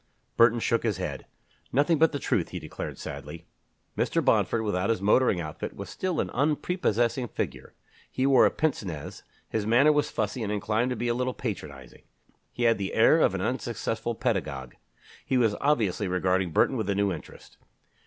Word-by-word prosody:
Burton 115 0 +5
shook 115 0 +1
his 110 -5 -1
head. 75 -7 -5 0.4
"Nothing 145 +4 +2
but 160 0 +5
the 145 - -2
truth," - - -1
he - - -6
declared - - -7
sadly. 75 +3 -8 0.5
Mr. - - 0
Bomford, 115 - +2
without 100 -2 -1
his 115 - +1
motoring 105 0 +3
outfit, 80 -2 -6
was - - -7
still 185 -2 -2
an - - -1
unprepossessing 135 - 0
figure. - - -5 0.3
He 130 - -1
wore 135 -2 +6
a - - +2
pince 155 -7 -1
nez; 80 -7 -7 0.3
his 105 -2 -2
manner 130 +7 +5
was 150 -1 +1
fussy 110 +3 -2
and 105 -2 -2
inclined 110 +4 0
to 125 - -1
be 120 - -2
a 120 - +2
little 125 +1 -2
patronizing. 75 - -7 0.5
He 120 - -4
had 115 -2 +3
the 95 - -3
air 120 +8 +5
of 95 - +3
an 95 - -2
unsuccessful 115 -1 -2
pedagogue. 75 - -2 0.5
He 130 - 0
was 115 -4 +3
obviously 110 -9 +1
regarding 90 0 +1
Burton 130 - +2
with 110 -3 -2
a 100 - +1
new 100 -1 +1
interest. 80 - -12
115 Hz, 185 wpm, -27 LUFS, 95-130 Hz, 0.5 s, wore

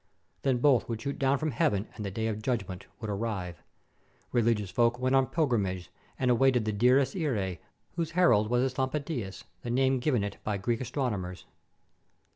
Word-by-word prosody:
Then 135 -3 +2
both 125 -2 +3
would 115 -2 -2
shoot 140 +5 -4
down 135 +1 +3
from 155 +2 -1
heaven, 105 -3 +1
and 105 - -7
the 100 - -2
Day 110 +4 -3
of 110 -1 -2
Judgment 100 -6 -3
would 110 - -5
arrive. 100 -5 -3 0.7
Religious 115 -5 +1
folk 120 0 +2
went 130 +1 0
on 135 -1 +4
pilgrimages 100 - 0 0.3
and 125 -1 +2
awaited 125 -2 +3
the 110 - -1
Dies 125 +5 +4
ires, 105 - -1 0.4
whose 165 -1 -2
herald 110 - +5
was 125 +1 +2
this 130 0 -2
Lampadias, 130 -6 -2 0.2
the 120 - -5
name 130 +2 +2
given 125 -5 +1
it 100 -1 -4
by 105 -2 -1
Greek 115 +4 -1
astron 130 -1 -1
omers. 90 -2 -6
120 Hz, 180 wpm, -29 LUFS, 105-130 Hz, 0.7 s, herald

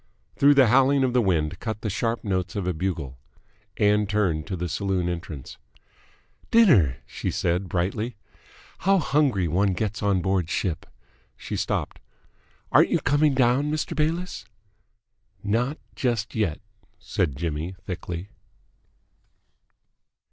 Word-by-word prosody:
Through 145 +1 +5
the 135 -5 +6
howling 135 +2 +4
of 125 -2 +1
the 125 - +4
wind 80 -7 0
cut 110 -2 -4
the 110 - -2
sharp 115 +4 -1
notes 95 -2 -2
of 100 -3 -2
a 90 - 0
bugle. 80 -7 -4 0.6
Ann 105 0 +3
turned 95 -7 0
to 95 - -3
the 90 0 -3
saloon 95 0 -1
entrance. 85 -5 -6 0.9
"Dinner!" 120 - +5
she - - -4
said 90 +2 -1
brightly. 100 +7 -2 0.6
"How 195 +2 +3
hungry 135 - +2
one 95 +4 +1
gets 105 +4 -3
on 100 -4 +1
board 95 -3 0
ship!" 90 -3 -2 0.5
She - - -5
stopped. - - -2 0.7
"Aren't - - +5
you - - +2
coming 145 0 +2
down, 130 +3 +3
Mr. 155 0 -2
Bayliss?" 165 +4 -2 1.0
"Not 120 +8 0 0.2
just 120 -4 -1
yet," 105 -9 -1 0.4
said 75 -7 -2
Jimmy 80 +3 -3
thickly. 90 0 -5
100 Hz, 130 wpm, -25 LUFS, 90-125 Hz, 1.0 s, the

